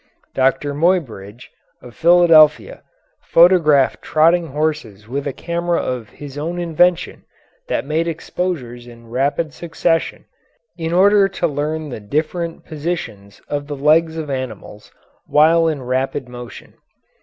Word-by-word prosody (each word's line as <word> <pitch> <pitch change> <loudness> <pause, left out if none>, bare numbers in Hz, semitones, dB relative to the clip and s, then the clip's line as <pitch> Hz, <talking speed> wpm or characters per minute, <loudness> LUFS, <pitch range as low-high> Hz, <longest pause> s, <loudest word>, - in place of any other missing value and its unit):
Doctor 135 +2 0
Muybridge, 130 - -2 0.3
of 125 - -13
Philadelphia, 165 -3 +4 0.4
photographed 165 -6 +4
trotting 165 +2 +2
horses 145 -9 -3
with 140 +4 -4
a - - -1
camera 170 +4 -2
of 120 -4 -4
his 145 +4 -10
own 170 +4 -4
invention 175 +1 +1 0.4
that - - -2
made 160 +3 -1
exposures 155 -7 -4
in 115 -1 -15
rapid 140 +5 -1
succession, 165 0 -2 0.5
in 165 -2 -4
order 200 +3 +4
to 195 -2 -3
learn 155 0 -3
the 120 - -6
different 155 - -3
positions 145 - -6
of 145 -1 -4
the 145 - -5
legs 160 +3 +2
of 155 -3 -5
animals 110 -5 -7 0.4
while 165 +2 +4
in 150 -5 -2
rapid 130 +1 -2
motion. 120 -1 -11
150 Hz, 125 wpm, -18 LUFS, 130-170 Hz, 0.5 s, Philadelphia